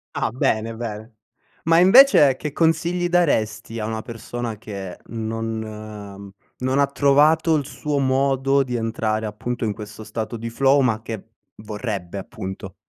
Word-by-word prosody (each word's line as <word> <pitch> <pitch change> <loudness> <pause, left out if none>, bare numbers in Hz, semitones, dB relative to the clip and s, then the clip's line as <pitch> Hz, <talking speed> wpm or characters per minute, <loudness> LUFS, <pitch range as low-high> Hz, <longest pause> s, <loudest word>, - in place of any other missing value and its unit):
Ah, - - 0
bene, 115 -2 0
bene. 110 -1 -6 0.5
Ma 165 0 +4
invece 185 - +7
che 150 - -5
consigli 170 +3 +1
daresti 115 -10 +1
a 105 - -2
una 110 0 -3
persona 115 0 -6
che 100 -4 -7
non 110 -3 -6 0.3
non 130 +1 0
ha 140 - +4
trovato 150 +4 +4
il 145 -2 -1
suo 150 +1 -3
modo 135 +1 +2
di 125 -2 -4
entrare 110 -1 -1
appunto 115 +4 -4
in 105 - -1
questo 105 0 -9
stato 110 +1 -5
di 115 0 -5
flow 135 +4 +3
ma 115 -4 +1
che 110 -2 -6 0.3
vorrebbe 105 -4 -5
appunto. 95 -1 -7
115 Hz, 145 wpm, -22 LUFS, 110-140 Hz, 0.5 s, invece